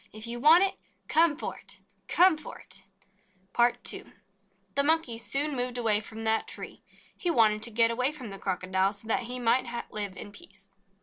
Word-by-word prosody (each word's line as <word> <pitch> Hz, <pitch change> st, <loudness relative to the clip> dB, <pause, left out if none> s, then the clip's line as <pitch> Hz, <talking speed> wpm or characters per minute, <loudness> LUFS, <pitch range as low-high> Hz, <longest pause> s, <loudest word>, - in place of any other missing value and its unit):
If 215 Hz, +1 st, -7 dB
you 235 Hz, +1 st, -4 dB
want 320 Hz, +8 st, +6 dB
it, 390 Hz, -, -1 dB, 0.3 s
come 320 Hz, -2 st, +3 dB
for -, -, -5 dB
it, -, -, -11 dB, 0.3 s
come 360 Hz, -1 st, +5 dB
for 310 Hz, -, -10 dB
it 195 Hz, -, -9 dB, 0.4 s
!" 185 Hz, -1 st, -39 dB
PART 240 Hz, 0 st, +2 dB
II -, -, -7 dB, 0.7 s
THE 280 Hz, -, +4 dB
Monkey 300 Hz, -7 st, +1 dB
soon 285 Hz, +4 st, -1 dB
moved 250 Hz, 0 st, -1 dB
away 220 Hz, -3 st, +2 dB
from 220 Hz, +1 st, -9 dB
that 220 Hz, 0 st, +1 dB
tree. -, -, -8 dB, 0.3 s
He 350 Hz, -, -2 dB
wanted 220 Hz, -8 st, +3 dB
to 235 Hz, -, +6 dB
get 230 Hz, +1 st, +3 dB
away 250 Hz, +4 st, +1 dB
from 255 Hz, -8 st, -9 dB
the 195 Hz, -, -9 dB
Crocodile, 190 Hz, +1 st, -1 dB
so 205 Hz, +2 st, -8 dB
that 225 Hz, -, +1 dB
he 250 Hz, 0 st, -2 dB
might 240 Hz, +1 st, +1 dB, 0.2 s
live 205 Hz, -3 st, -2 dB
in 205 Hz, -, -8 dB
peace. 195 Hz, -1 st, -13 dB
230 Hz, 195 wpm, -28 LUFS, 205-275 Hz, 0.7 s, want